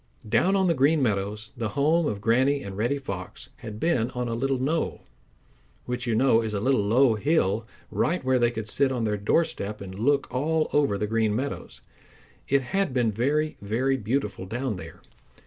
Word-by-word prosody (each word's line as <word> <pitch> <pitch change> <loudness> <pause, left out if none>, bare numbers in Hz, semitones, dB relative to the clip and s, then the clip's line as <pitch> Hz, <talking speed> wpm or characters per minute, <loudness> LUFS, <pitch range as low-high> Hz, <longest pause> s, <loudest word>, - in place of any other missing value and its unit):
Down 120 - +3
on 190 -1 +3
the 170 - +3
Green 150 +2 +3
Meadows, 105 0 -2
the 115 -2 -2
home 155 +3 +3
of 100 -5 -3
Granny 130 +6 +2
and 100 -1 -7
Reddy 120 +7 0
Fox 100 -3 -7
had 110 -5 -8
been 125 -7 +1
on 125 0 -2
a 115 - -2
little 135 +3 0
knoll, 150 +6 -1 0.8
which 125 +1 -4
you 115 - +1
know 115 -1 +4
is 110 -2 -3
a - - 0
little 130 +1 +2
low 115 +4 +4
hill, 110 - +1 0.2
right 170 +1 0
where 130 -1 +3
they 120 -1 +3
could 110 -2 -5
sit 135 +5 +2
on 125 -3 -1
their 105 -1 0
doorstep 105 -1 0
and 95 0 -8
look 140 +4 +2
all 155 +4 +1
over 140 -9 +2
the 105 - -1
Green 110 -1 +1
Meadows. 135 +4 -4 0.7
It 140 0 +2
had 195 +1 -1
been 120 -3 +2
very, 145 +8 0
very 120 +7 0
beautiful 105 -5 -2
down 120 0 -3
there. - - -11
125 Hz, 190 wpm, -26 LUFS, 105-140 Hz, 0.8 s, know